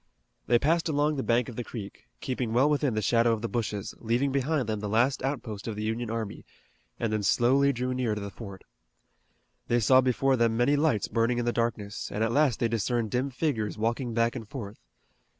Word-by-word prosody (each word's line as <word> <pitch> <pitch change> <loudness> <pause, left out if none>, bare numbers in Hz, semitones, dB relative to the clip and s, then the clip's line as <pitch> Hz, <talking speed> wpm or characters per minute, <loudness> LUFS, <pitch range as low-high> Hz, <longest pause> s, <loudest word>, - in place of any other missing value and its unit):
They 120 - +5
passed 165 +6 +1
along 150 0 +1
the - - 0
bank 120 -1 +1
of 120 - -8
the 120 - -3
creek, 105 - -9
keeping 125 -3 -2
well 130 +5 +4
within 145 -5 +1
the 110 - -1
shadow 115 +1 +3
of 110 0 -4
the - - 0
bushes, 105 -4 -3
leaving 120 +5 0
behind 140 -1 0
them 110 -1 -2
the 105 0 -4
last 120 +6 +2
outpost 120 -7 -4
of 110 - -3
the 105 - -4
Union 115 +1 -2
army, 110 -2 -4 0.6
and 115 -2 -1
then 110 - 0
slowly 130 +6 +3
drew 125 0 -2
near 125 -4 -1
to 105 - -5
the 100 0 -6
fort. 100 -4 -10 1.0
They 120 - +2
saw 130 +3 +5
before 130 +1 +2
them 115 -1 +2
many 125 +5 +3
lights 145 -9 +1
burning 115 +1 +1
in 120 - -1
the 120 - +1
darkness, 110 -3 -2
and 105 - -1
at 115 - +1
last 140 -4 +2
they 120 - +2
discerned 115 0 -1
dim 130 +3 0
figures 125 -6 -2
walking 115 +2 -1
back 115 +1 +1
and 115 -4 -6
forth. 110 -6 -7
120 Hz, 215 wpm, -28 LUFS, 110-130 Hz, 1.0 s, They